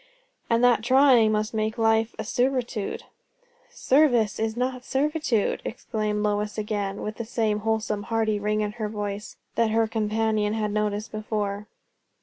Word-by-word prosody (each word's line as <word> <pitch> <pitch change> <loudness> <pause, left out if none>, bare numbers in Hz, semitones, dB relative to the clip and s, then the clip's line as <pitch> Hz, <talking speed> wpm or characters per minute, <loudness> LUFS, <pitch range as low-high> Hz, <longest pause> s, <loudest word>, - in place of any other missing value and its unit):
"And 230 +1 +2
that 245 -3 +5
trying 255 -2 +5
must 215 +1 -1
make 220 +1 -1
life 225 0 +2
a - - -3
servitude." 245 -2 -1 0.7
"Service 250 -7 +2 0.2
not 255 0 -2
servitude!" 275 -5 0
exclaimed 215 -2 -3
Lois 210 0 -1
again, 205 -2 -3
with 215 0 -5
the 230 - -3
same 220 -2 0
wholesome, 220 -1 -1
hearty 220 -2 +1
ring 210 +1 0
in 210 -1 -1
her 215 -1 -4
voice 205 0 -5 0.2
that 230 -1 +2
her 225 0 +2
companion 215 -1 0
had 210 -1 -1
noticed 210 0 -1
before. 210 -1 -3
220 Hz, 140 wpm, -25 LUFS, 210-230 Hz, 0.7 s, that